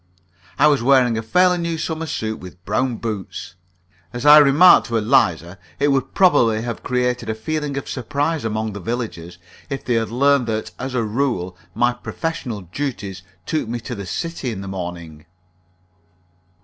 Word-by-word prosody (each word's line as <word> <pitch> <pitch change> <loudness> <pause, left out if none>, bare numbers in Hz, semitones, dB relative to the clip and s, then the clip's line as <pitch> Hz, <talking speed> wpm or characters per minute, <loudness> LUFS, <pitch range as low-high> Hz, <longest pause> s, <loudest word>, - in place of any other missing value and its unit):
I - - +5
was 145 -4 +4
wearing 125 -2 +4
a 110 - -1
fairly 180 +9 +3
new 170 -1 -2
summer 160 0 -3
suit, 110 -6 -3
with 90 -1 -12
brown 120 +3 0
boots. 105 -6 -5 0.6
As 120 +3 -5
I 150 +1 +10
remarked 150 +5 +6
to 115 -2 0
Eliza, 95 - +1 0.2
it 145 +1 +2
would 135 -2 0
probably 120 - +4
have 120 -1 -5
created 125 -2 -1
a 110 - -1
feeling 145 +5 -3
of 140 - -5
surprise 145 +5 -2
among 110 -1 -2
the 100 - -6
villagers 95 -6 -5 0.3
if 135 -1 -5
they 125 - 0
had 115 -1 0
learned 135 +1 +2
that, 110 -1 -3
as 130 0 -4
a 120 - +1
rule, 105 -6 -1 0.2
my 120 0 +2
professional 125 - -5
duties 100 - -5 0.2
took 155 -7 -2
me 120 +1 -3
to 125 - -6
the 100 -4 -6
city 165 - -4
in 105 -5 -5
the 100 - -7
morning. 85 -4 -7
120 Hz, 170 wpm, -21 LUFS, 105-140 Hz, 0.6 s, I